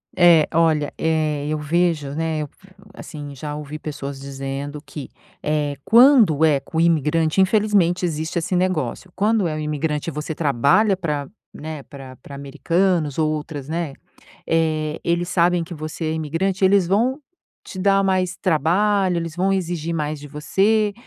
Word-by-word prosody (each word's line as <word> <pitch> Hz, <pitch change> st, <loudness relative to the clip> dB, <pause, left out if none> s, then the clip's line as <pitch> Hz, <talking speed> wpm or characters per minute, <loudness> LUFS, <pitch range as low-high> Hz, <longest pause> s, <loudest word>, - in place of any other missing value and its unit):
É, 170 Hz, -4 st, +6 dB
olha, 160 Hz, -3 st, +2 dB
eh, 155 Hz, -2 st, 0 dB
eu 155 Hz, -, -1 dB
vejo, 155 Hz, -1 st, 0 dB
né, 160 Hz, 0 st, -2 dB
eu 150 Hz, -, -4 dB
f 195 Hz, -, -23 dB, 0.3 s
assim, 145 Hz, -4 st, -9 dB
já 145 Hz, +2 st, -6 dB
ouvi 150 Hz, 0 st, -7 dB
pessoas 140 Hz, -3 st, -6 dB
dizendo 140 Hz, +1 st, -6 dB
que, 145 Hz, -1 st, -8 dB, 0.3 s
eh, 150 Hz, -2 st, -1 dB
quando 230 Hz, -, +6 dB
é 150 Hz, -3 st, +4 dB
com 160 Hz, -, -8 dB
o -, -, +4 dB
imigrante, 160 Hz, 0 st, +2 dB
infelizmente 190 Hz, -3 st, +2 dB
existe 160 Hz, 0 st, -3 dB
esse 170 Hz, +2 st, -2 dB
negócio, 180 Hz, -3 st, -1 dB
quando 210 Hz, -1 st, +2 dB
é 155 Hz, -, -3 dB
o -, -, -4 dB
imigrante, 150 Hz, +1 st, -2 dB
e -, -, -7 dB
você 150 Hz, +1 st, -4 dB
trabalha 155 Hz, -, +2 dB
pra, 150 Hz, -6 st, -3 dB, 0.2 s
né, 155 Hz, -1 st, -7 dB
pra 135 Hz, -2 st, -11 dB
pra 140 Hz, -, -11 dB
americanos, 155 Hz, +2 st, 0 dB
ou 155 Hz, -1 st, +1 dB
outras, 150 Hz, -2 st, -5 dB
né, 165 Hz, -3 st, -3 dB, 0.5 s
eh, 155 Hz, -1 st, 0 dB
eles 175 Hz, +1 st, 0 dB
sabem 175 Hz, -1 st, +2 dB
que 170 Hz, +1 st, -8 dB
você 155 Hz, +1 st, -6 dB
é 155 Hz, -, -1 dB
imigrante, 165 Hz, +5 st, -1 dB
eles 195 Hz, -1 st, +4 dB
vão 240 Hz, +9 st, +1 dB, 0.4 s
te 185 Hz, -, -9 dB
dar 195 Hz, +1 st, +3 dB
mais 185 Hz, -1 st, 0 dB
trabalho, 185 Hz, +3 st, +1 dB
eles 165 Hz, -1 st, -4 dB
vão 190 Hz, +2 st, +1 dB
exigir 170 Hz, -3 st, -2 dB
mais 150 Hz, -1 st, -3 dB
de 145 Hz, -, -10 dB
você 200 Hz, +8 st, +1 dB
160 Hz, 165 wpm, -21 LUFS, 150-185 Hz, 0.5 s, É